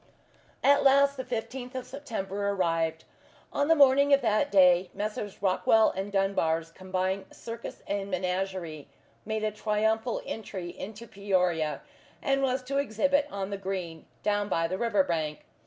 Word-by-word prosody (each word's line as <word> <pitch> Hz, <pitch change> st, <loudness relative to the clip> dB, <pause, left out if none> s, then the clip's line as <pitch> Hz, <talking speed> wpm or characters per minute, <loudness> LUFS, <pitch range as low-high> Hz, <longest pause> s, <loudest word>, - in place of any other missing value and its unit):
At 285 Hz, 0 st, +5 dB
last 280 Hz, +1 st, +5 dB
the 260 Hz, -, -4 dB
fifteenth 250 Hz, +1 st, -5 dB
of 255 Hz, -1 st, -4 dB
September 205 Hz, -7 st, -4 dB
arrived. 165 Hz, -4 st, 0 dB, 0.5 s
On 285 Hz, -, +1 dB
the 325 Hz, -, +5 dB
morning 280 Hz, 0 st, +5 dB
of 280 Hz, -, +5 dB
that 215 Hz, -2 st, +1 dB
day 180 Hz, -2 st, +5 dB
Messrs. 205 Hz, -1 st, -4 dB
Rockwell 215 Hz, +3 st, +4 dB
and 195 Hz, +2 st, -4 dB
Dunbar's 165 Hz, -5 st, 0 dB
Combined 185 Hz, +2 st, -2 dB
Circus 230 Hz, 0 st, -8 dB
and 200 Hz, 0 st, -3 dB
Menagerie 185 Hz, -4 st, -3 dB, 0.4 s
made 220 Hz, -1 st, -2 dB
a 215 Hz, -, +1 dB
triumphal 220 Hz, +2 st, 0 dB
entry 190 Hz, -5 st, -5 dB
into 215 Hz, +5 st, -8 dB
Peoria, 180 Hz, -7 st, 0 dB, 0.4 s
and 275 Hz, 0 st, +1 dB
was 260 Hz, -1 st, 0 dB
to 275 Hz, +2 st, -1 dB
exhibit 280 Hz, +3 st, +1 dB
on 200 Hz, 0 st, -4 dB
the 200 Hz, -, -2 dB
green, 185 Hz, -4 st, -5 dB, 0.2 s
down 205 Hz, 0 st, 0 dB
by 165 Hz, -2 st, +1 dB
the 185 Hz, +3 st, -3 dB
river 230 Hz, -5 st, +2 dB
bank. 155 Hz, -4 st, -3 dB
200 Hz, 150 wpm, -28 LUFS, 185-245 Hz, 0.5 s, At